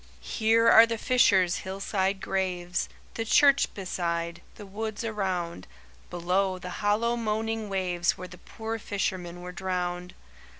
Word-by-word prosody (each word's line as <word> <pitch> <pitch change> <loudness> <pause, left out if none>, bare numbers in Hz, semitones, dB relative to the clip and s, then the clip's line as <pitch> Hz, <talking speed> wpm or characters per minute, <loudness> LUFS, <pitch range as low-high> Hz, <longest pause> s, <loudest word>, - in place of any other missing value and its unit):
"'Here 225 +1 +2
are 230 0 +8
the 230 0 -2
fishers' 200 -7 +3
hillside 195 0 -2
graves, 180 -2 -2 0.2
The 225 - -2
church 280 +4 +4
beside, 170 -3 -3
the 210 - -10
woods 215 +3 -5
around, 185 - -3 0.4
Below, 185 +2 0
the 180 -1 -7
hollow 215 +3 +2
moaning 225 -1 -2
waves 180 -3 0
Where 185 - -7
the 180 - -13
poor 225 0 -6
fishermen 180 -4 -3
were 180 - -6
drowned. 180 -1 -3
190 Hz, 130 wpm, -27 LUFS, 180-220 Hz, 0.4 s, are